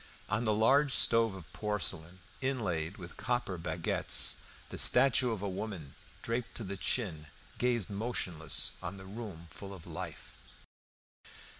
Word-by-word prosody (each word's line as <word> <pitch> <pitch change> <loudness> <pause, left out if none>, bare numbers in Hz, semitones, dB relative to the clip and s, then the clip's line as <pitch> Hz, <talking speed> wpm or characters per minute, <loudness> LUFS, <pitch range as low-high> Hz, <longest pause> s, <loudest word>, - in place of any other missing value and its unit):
On 105 +4 0
the 110 - +3
large 135 +6 +4
stove 115 -3 +4
of 85 -5 -11
porcelain 95 -4 -2 0.2
inlaid 100 -11 -1
with 90 -2 -9
copper 120 -6 -1
baguettes 80 -1 0 0.3
the - - -4
statue 135 -2 +7
of 110 -4 -3
a - - 0
woman, 95 -7 -5 0.3
draped 115 0 -2
to 115 - -2
the 100 0 -4
chin, 90 -7 -1 0.3
gazed 120 -5 +1
motionless 90 - 0
on 95 +2 -5
the 95 - -10
room 100 -5 -7
full 100 +3 -8
of 85 - -12
life. - - -7
100 Hz, 140 wpm, -32 LUFS, 90-115 Hz, 0.3 s, statue